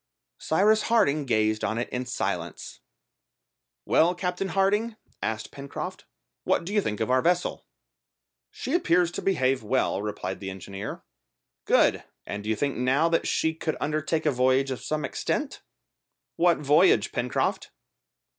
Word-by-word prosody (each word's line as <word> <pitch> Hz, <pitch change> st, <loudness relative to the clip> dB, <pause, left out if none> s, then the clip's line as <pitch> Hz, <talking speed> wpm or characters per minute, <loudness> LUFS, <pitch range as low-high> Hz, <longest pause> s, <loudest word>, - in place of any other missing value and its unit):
Cyrus 210 Hz, +6 st, +3 dB
Harding 155 Hz, -11 st, +3 dB
gazed 110 Hz, -2 st, +1 dB
on 110 Hz, -, -1 dB
it 120 Hz, -, -1 dB
in 125 Hz, 0 st, -4 dB
silence. 125 Hz, -, -4 dB, 1.1 s
"Well, 175 Hz, +3 st, +3 dB
Captain 180 Hz, +1 st, -2 dB
Harding," 200 Hz, +5 st, +1 dB, 0.3 s
asked 110 Hz, 0 st, -3 dB
Pencroft, 140 Hz, 0 st, -7 dB, 0.4 s
"what -, -, +1 dB
do 195 Hz, -, -5 dB
you 210 Hz, -, +3 dB
think 105 Hz, -, -3 dB
of 110 Hz, +3 st, -1 dB
our 130 Hz, 0 st, +4 dB
vessel?" 175 Hz, +3 st, 0 dB, 0.8 s
"She 265 Hz, -, -5 dB
appears 180 Hz, -, +3 dB
to -, -, -5 dB
behave 135 Hz, -8 st, +1 dB
well," 110 Hz, -2 st, 0 dB
replied 100 Hz, -3 st, -4 dB
the 95 Hz, -, -5 dB
engineer. 95 Hz, +2 st, -7 dB, 0.6 s
"Good! -, -, +3 dB, 0.2 s
And 100 Hz, 0 st, -5 dB
do 105 Hz, -, -5 dB
you 110 Hz, -, +2 dB
think 140 Hz, +4 st, -1 dB
now 135 Hz, +6 st, +2 dB
that 165 Hz, -, +1 dB
she 160 Hz, -, +1 dB
could 160 Hz, 0 st, -3 dB
undertake 155 Hz, +2 st, -1 dB
a 150 Hz, -, +4 dB
voyage 130 Hz, +1 st, +2 dB
of 130 Hz, -, -4 dB
some 155 Hz, -1 st, -2 dB
extent?" -, -, -3 dB, 0.7 s
"What 175 Hz, 0 st, +3 dB
voyage, 150 Hz, -, +4 dB
Pencroft?" 125 Hz, 0 st, -1 dB
145 Hz, 145 wpm, -26 LUFS, 120-175 Hz, 1.1 s, our